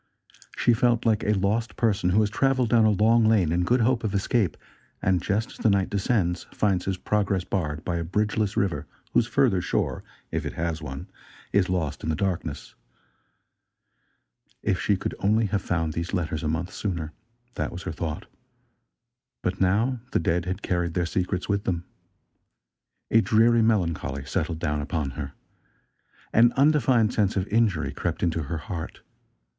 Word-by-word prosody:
She 120 - +4
felt 120 0 +2
like 110 -2 +2
a 105 - +2
lost 105 +5 0
person 100 -5 +1
who 100 +4 +4
has 105 -1 0
traveled 130 0 +2
down 115 -2 +5
a - - +5
long 110 +3 +4
lane 105 -7 +3
in 85 +1 +1
good 120 +7 +2
hope 120 +1 +2
of 105 -2 -1
escape, 100 -2 +1 0.4
and, 90 -2 +1
just 105 +5 -1
as - - -13
the 110 - +2
night 100 -2 +1
descends 95 -4 0
finds 95 -4 0
his 95 -1 -1
progress 100 -2 0
barred 75 -6 -3
by 85 -1 -1
a 85 - -2
bridge 105 +5 -1
less 105 -2 -1
river 95 -4 0 0.3
whose 120 - +3
further 120 -10 +2
shore, - - -1 0.3
if - - -2
it - - -4
has 80 -1 -2
one, 70 -2 -7 0.5
is 95 -3 +3
lost 85 -6 -1
in - - -3
the 80 - +1
darkness. 90 -5 -3 1.9
If 95 -3 0
she 100 - +2
could - - -3
only 110 +3 +2
have 100 -1 -1
found 80 -4 -1
these 85 +4 -3
letters 80 -3 -2
a 80 - -2
month 85 +5 -2
sooner! 85 -6 -3 0.4
That 75 - -3
was 90 - -7
her - - -3
thought. 80 -2 -4 1.2
But 90 +1 -2
now 110 +7 +2
the - - +3
dead 90 -1 0
had 95 +2 -4
carried 85 -2 -1
their 90 -1 +1
secrets 90 +1 -2
with 100 0 -1
them. 85 -2 -1 1.3
A 115 - +6
dreary, 115 +2 +4
melancholy 85 - 0
settled 80 +1 -2
down 75 -3 -1
upon 75 -2 -2
her. 70 -1 -6 1.0
An 120 +1 +5
undefined 130 -6 +3
sense 105 -2 +1
of 95 0 -1
injury 105 -7 +1
crept - - -3
into 85 -2 +1
her 75 +3 -4
heart. 80 0 -6
95 Hz, 175 wpm, -25 LUFS, 85-110 Hz, 1.9 s, A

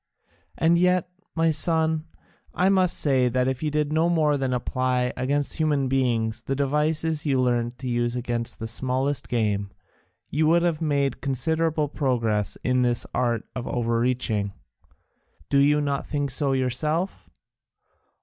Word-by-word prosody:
And 170 +1 +3
yet, 180 -1 +2 0.3
my 165 0 +2
son, 160 0 +1 0.5
I 185 +1 +3
must 185 -2 +3
say 130 -4 +3
that 125 +1 0
if 130 -1 -2
you 155 - 0
did 150 0 -1
no 160 +2 +2
more 155 -3 +2
than 135 -2 -1
apply 125 0 -1
against 140 +3 -1
human 150 -4 +1
beings 115 -4 0
the 135 - -3
devices 150 +3 0
you 135 -2 +2
learnt 120 -1 0
to 130 0 -6
use 120 0 0
against 120 -1 -2
the 115 - -5
smallest 130 +4 0
game, 105 -4 0 0.6
you 155 +2 +2
would 170 +2 +4
have 170 -2 0
made 140 -3 0
considerable 160 +3 0
progress 115 -8 0
in 125 0 +2
this 120 -1 +2
art 120 -3 0
of 125 -1 -5
overreaching. 115 -3 0 1.0
Do 140 - +3
you 145 +1 +4
not 140 -1 -2
think 145 -2 -2
so 135 +1 0
yourself? 150 +8 -1
135 Hz, 150 wpm, -24 LUFS, 125-155 Hz, 1.0 s, would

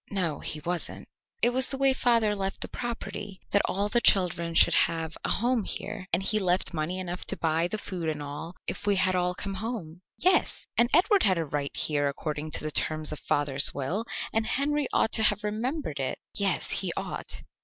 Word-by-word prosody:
"No, 175 -7 -1
he 155 - -3
wasn't." 175 +2 -4 0.4
"It 240 - +6
was 260 +1 +4
the 270 - -3
way 270 0 +4
father 230 -5 +2
left 195 -1 -3
the - - -1
property 230 -5 -6
that 200 - +4
all 200 +2 0
the 240 +3 +1
children 170 -5 +3
should - - +6
have 160 -1 +2
a - - -1
home 240 +1 +1
here 200 0 -5
and 175 +3 +1
he 215 +2 +2
left 185 -1 +1
money 160 +3 -2
enough 180 -1 -4
to 195 - -2
buy 165 +1 +1
the 215 - -3
food 180 -5 -4
and 155 -1 -3
all 145 +4 -7
if 205 - -4
we 205 - +4
had 185 0 +3
all 180 0 0
come 195 +1 -4
home." 190 -5 -5 0.2
"Yes." 370 +1 +2
"And 240 0 +3
Edward 390 +5 +4
had 190 -3 +3
a 165 - -1
right 145 -1 -3
here 145 -2 +1
according 150 +2 -4
to - - +1
the 155 - -3
terms 155 +1 +1
of 150 - -5
father's 145 -1 +2
will, 165 +12 -2 0.3
and 220 0 +1
Henry 290 +1 +1
ought - - +2
to 220 - +3
have 210 -1 +4
remembered 215 - -3
it." 135 - -2 0.2
"Yes, 195 -3 0
he - - +1
ought." - - -5
185 Hz, 210 wpm, -27 LUFS, 160-220 Hz, 0.4 s, It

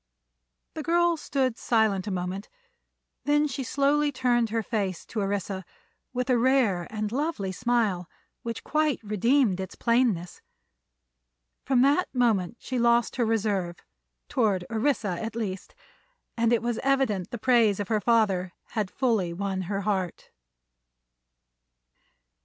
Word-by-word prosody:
The 315 - -5
girl 345 +2 +2
stood 265 -5 -1
silent 220 -4 +1
a - - -1
moment; 185 +2 -4 0.8
then 295 +1 +3
she 270 -1 -4
slowly 285 +3 +2
turned 245 -3 +1
her 225 +1 -1
face 195 -6 -2
to 225 - -5
Orissa 195 -1 -2 0.5
with 250 0 -2
a 245 - +3
rare 235 -9 +2
and 215 -1 -3
lovely 265 - -2
smile 210 -5 0 0.3
which 230 -1 -5
quite 305 -2 +1
redeemed 215 0 +2
its 190 0 -5
plainness. 230 -8 +1 1.2
From 255 -2 +3
that 290 +7 +3
moment 230 -4 +1
she 255 -2 -3
lost 235 0 +2
her 240 - +2
reserve, 200 -6 0 0.5
toward 205 -8 +1
Orissa 220 -6 0
at 225 0 -5
least, 195 -5 -5 0.6
and 230 0 +2
it 235 -1 +2
was 240 -1 -1
evident 265 -9 +1
the 240 - -5
praise 230 -4 +3
of 205 - -3
her 215 -2 +1
father 195 -5 +2 0.2
had 215 -4 -2
fully 220 -10 0
won 190 +1 -2
her 200 -1 -1
heart. 190 -4 -2
225 Hz, 135 wpm, -27 LUFS, 195-255 Hz, 1.2 s, then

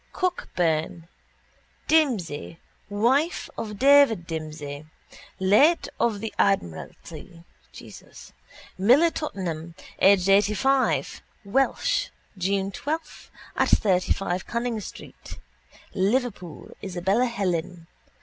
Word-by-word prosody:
—Cockburn. 170 - -1 0.8
Dimsey, 215 - +1 0.3
wife 255 - +1
of 210 -2 -6
David 270 -7 +5
Dimsey, 155 -2 -6 0.5
late 215 - +4
of 225 -4 0
the 225 - -5
admiralty: 165 - -3 1.4
Miller, 265 - +5
Tottenham, 170 - -5 0.2
aged 190 -1 +5
eightyfive: 210 +7 +2 0.2
Welsh, 270 - +1 0.3
June 195 +1 -1
12, 315 +9 -5 0.3
at - - +1
35 185 -2 +1
Canning 235 -1 -2
street, - - -11 0.6
Liverpool, 195 - -2
Isabella 190 +6 0
Helen. 180 -6 -3
195 Hz, 80 wpm, -25 LUFS, 175-245 Hz, 1.4 s, David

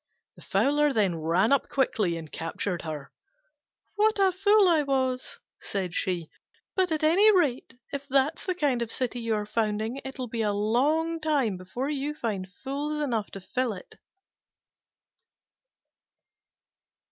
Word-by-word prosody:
The - - -16
Fowler 295 +1 +2
then 200 -7 +2
ran 170 - +2
up 280 - +2
quickly 210 -10 +1
and 160 -2 -9
captured 170 +2 -3
her. 150 -4 -6 0.9
"What 435 +1 +3
a 390 -1 +4
fool 400 +2 +4
I 330 -3 +4
was!" 260 -2 -1 0.2
said 185 -4 -3
she: 175 -4 -1 0.5
"but 370 -2 +1
at 315 0 -1
any 365 +8 +6
rate, 270 -9 0 0.2
if 280 0 -4
that's 275 +6 +1
the 370 - 0
kind 280 -8 +1
of 230 -1 -3
city 250 -1 -2
you 230 -1 0
are 210 -1 -2
founding, 220 +3 -1
it'll 265 -1 -5
be 230 -1 -3
a 210 -2 +1
long 290 +11 +1
time 285 -10 +1
before 215 +10 -4
you 295 +1 -2
find 200 -8 -3
fools 285 +8 -4
enough 235 -8 -1
to 195 - -8
fill 250 +5 -1
it." 185 - -12
255 Hz, 145 wpm, -27 LUFS, 205-300 Hz, 0.9 s, any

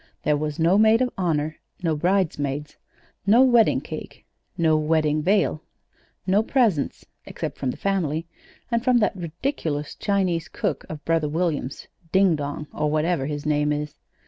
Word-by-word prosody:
There 150 - +2
was 150 0 -3
no 170 +5 +4
maid 220 +3 +5
of 250 - -1
honor, 155 -4 -1 0.3
no 165 -2 +1
bridesmaids, 150 -5 -1 0.5
no 230 +6 +7
wedding 240 -4 +4
cake, - - -9 0.3
no 160 -2 +3
wedding 155 0 +1
veil, 185 -3 +2 0.6
no 195 +3 +3
presents 220 - +1 0.2
(except - - -5
from 130 - -1
the - - -4
family, 165 -5 -1 0.5
and 235 0 +1
from 255 -1 +4
that 210 -4 +2
ridiculous 165 - -3
Chinese 185 -5 0
cook - - -3
of 155 -2 -8
brother 165 -2 +1
William's, 155 -4 -2 0.3
Ding 190 -3 +4
Dong, 145 +1 -4
or 150 - 0
whatever 155 -2 0
his 145 -1 -4
name 150 0 +1
is. 150 0 -3
160 Hz, 150 wpm, -24 LUFS, 150-195 Hz, 0.6 s, no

